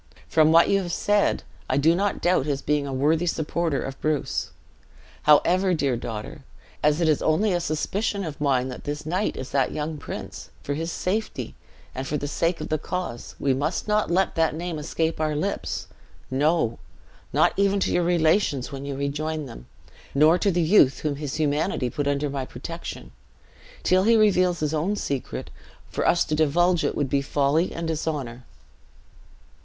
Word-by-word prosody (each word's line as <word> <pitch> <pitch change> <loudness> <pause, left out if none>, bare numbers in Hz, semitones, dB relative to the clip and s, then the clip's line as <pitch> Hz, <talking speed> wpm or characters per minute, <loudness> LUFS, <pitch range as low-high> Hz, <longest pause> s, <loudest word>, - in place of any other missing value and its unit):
From 155 -1 +4
what 165 +1 +6
you 195 0 +2
have 175 -2 -4
said, 205 +3 +1 0.3
I 130 - +2
do 155 +4 +4
not 200 +2 -1
doubt 175 -5 +2
his 140 -2 -2
being 145 -1 0
a - - -4
worthy 155 +6 +1
supporter 160 -1 -1
of 135 0 -7
Bruce. 155 -2 -1 0.8
However, 180 +5 +5
dear 140 -5 +1
daughter, 115 +4 -6 0.4
as 150 +2 +2
it 165 - +3
is 155 -2 +2
only 185 +6 +2
a 175 - +1
suspicion 200 +6 -1
of 155 -4 -6
mine 130 -3 +1
that 125 - -8
this 145 +1 -4
knight 180 +6 -1
is 130 - -6
that 135 -2 +1
young 150 0 -3
prince, - - -7
for 145 - -2
his 165 +3 -3
safety, 190 - -3 0.4
and 130 +1 -5
for 150 - -1
the 145 - -4
sake 165 +4 0
of 155 - -5
the 155 - 0
cause, 180 -9 -5
we 135 -1 +2
must 145 +10 -2
not 210 0 +1
let 185 +3 +2
that 160 -2 +1
name 170 -1 -4
escape 160 +1 -2
our 155 -1 0
lips; 195 +7 -2 0.5
no, 145 -3 +1 0.5
not - - +3
even 200 0 +2
to - - +1
your 175 - +3
relations 165 -5 +2
when 135 -1 -6
you 140 - -3
rejoin 150 +2 -2
them, 115 - -11 0.5
nor 155 +5 +5
to 200 - +2
the 175 -2 +1
youth 155 -7 +4
whom 145 -2 -1
his 145 -3 -4
humanity 150 -3 0
put 145 +3 -2
under 145 +1 0
my 140 -1 -3
protection. 60 - -7 0.7
Till 185 +1 +4
he 225 +3 +4
reveals 185 -5 +3
his 150 0 0
own 165 +7 0
secret, 140 -9 -4 0.4
for - - -1
us 170 - +3
to 155 - -3
divulge 165 +3 +3
it - - 0
would 145 - 0
be 140 +1 +1
folly 145 +4 +1
and 165 0 -4
dishonor." 145 -6 -3
155 Hz, 180 wpm, -25 LUFS, 140-175 Hz, 0.8 s, what